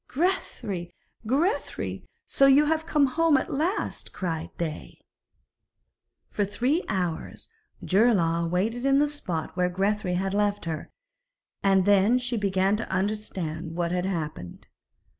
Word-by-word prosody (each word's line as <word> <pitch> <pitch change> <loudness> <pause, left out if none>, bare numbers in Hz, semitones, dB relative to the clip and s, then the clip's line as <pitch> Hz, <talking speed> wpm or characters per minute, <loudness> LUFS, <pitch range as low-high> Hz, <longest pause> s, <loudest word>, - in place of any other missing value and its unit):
'Grethari! 235 - -2 0.3
Grethari! 315 - -1 0.2
So 275 - +4
you 275 +2 +6
have 320 +1 0
come 295 -3 +3
home 310 +3 +3
at - - -3
last,' 330 +8 -2
cried 165 -4 -3
they. 160 -3 -5 1.3
For 205 - -1
three 250 - 0
hours 180 -5 -3 0.4
Geirlaug 175 -6 +3
waited 220 +8 -1
in 275 0 +4
the 295 +1 +4
spot 185 - -4
where 180 0 +1
Grethari 195 0 0
had 190 +1 -1
left 205 -1 0
her, 160 -2 -4 0.7
and 195 -2 +3
then 205 +4 +4
she 245 -1 -2
began 195 -1 +1
to 225 - -5
understand 185 -5 -3
what 170 -1 -1
had 180 +1 0
happened. 155 - -5
200 Hz, 130 wpm, -26 LUFS, 180-255 Hz, 1.3 s, you